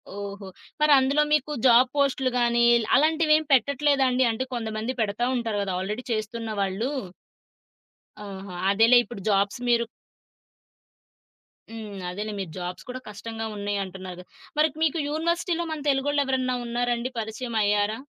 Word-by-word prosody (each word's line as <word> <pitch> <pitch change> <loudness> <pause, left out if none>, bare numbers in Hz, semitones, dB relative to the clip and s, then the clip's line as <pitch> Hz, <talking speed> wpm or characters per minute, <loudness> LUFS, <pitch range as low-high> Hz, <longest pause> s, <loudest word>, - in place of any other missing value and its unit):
ఓహో! 200 0 -7 0.3
మరందులో 285 0 +5
మీకు 300 -1 +2
జాబ్ 250 +1 +6
పోస్టులు 275 -2 +1
గానీ, 235 0 +3 0.3
అలాంటివేం 310 +1 +3
పెట్టట్లేదాండి? 270 0 +3
అంటే 225 +4 -3
కొంతమంది 225 +1 -3
పెడతా 220 +3 0
ఉంటారు 225 -3 -2
గదా! 190 -2 -3
ఆల్రెడీ 210 +6 -4
చేస్తున్న 220 +1 -4
వాళ్ళు. 195 +7 -1 1.3
ఆహా! 195 -2 -8
అదేలే 225 +5 +6
ఇప్పుడు 235 -4 -9
జాబ్స్ 200 +2 +1
మీరు 235 -1 +3 1.9
హ్మ్. 210 -4 -7
అదేలే. 210 +4 -4
మీరు 190 -5 -5
జాబ్స్ 180 0 -6
కూడా 255 +1 -5
కష్టంగా 225 +2 -6
ఉన్నాయి 205 0 -2
అంటున్నారు 185 -1 -8
గదా! - - -17 0.3
మరి 310 - +6 0.2
మీకు 320 0 +1
యూనివర్సిటీలో 340 +2 -1
మన 315 - -3
తెలుగోళ్ళెవరైనా 270 -2 +1
ఉన్నారండి? 240 +1 -1
పరిచయం 225 +2 -5
అయ్యారా? 205 +1 +1
235 Hz, 125 wpm, -25 LUFS, 205-270 Hz, 1.9 s, జాబ్